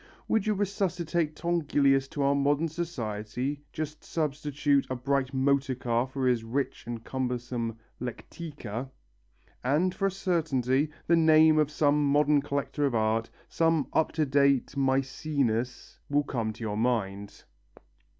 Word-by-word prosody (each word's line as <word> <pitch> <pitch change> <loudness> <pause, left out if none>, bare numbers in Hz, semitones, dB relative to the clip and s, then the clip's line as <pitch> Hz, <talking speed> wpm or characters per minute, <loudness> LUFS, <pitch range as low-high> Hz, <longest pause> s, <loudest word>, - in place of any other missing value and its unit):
Would 220 -2 +1
you 215 - +2
resuscitate 175 -5 -1
Tongilius 145 -5 +2
to 140 +1 -3
our 140 0 +3
modern 145 +3 +2
society 135 -4 -4
just 155 -1 -5
substitute 145 -2 0
a 130 - -1
bright 135 +1 0
motor 135 0 +1
car 120 0 0
for 130 0 -3
his 125 -3 +2
rich 125 0 -3
and 115 -1 -5
cumbersome 125 -3 -3 0.2
lectica 125 -1 -6 0.7
and, 155 +8 +2
for 195 - 0
a - - -1
certainty, 150 -7 0 0.2
the 170 - +4
name 160 -1 +6
of 150 -2 +2
some 150 -1 +2
modern 145 +1 +3
collector 145 0 -1
of 130 - -2
art, 110 +1 +1 0.2
some 165 -3 +1
up 160 - +2
to 155 -1 +1
date 140 -1 +2
Mæcenas, 135 -2 -1
will 145 +1 +2
come 115 -6 -2
to 115 - -9
your 105 -1 -2
mind. 100 -4 -2
140 Hz, 140 wpm, -28 LUFS, 125-155 Hz, 0.7 s, name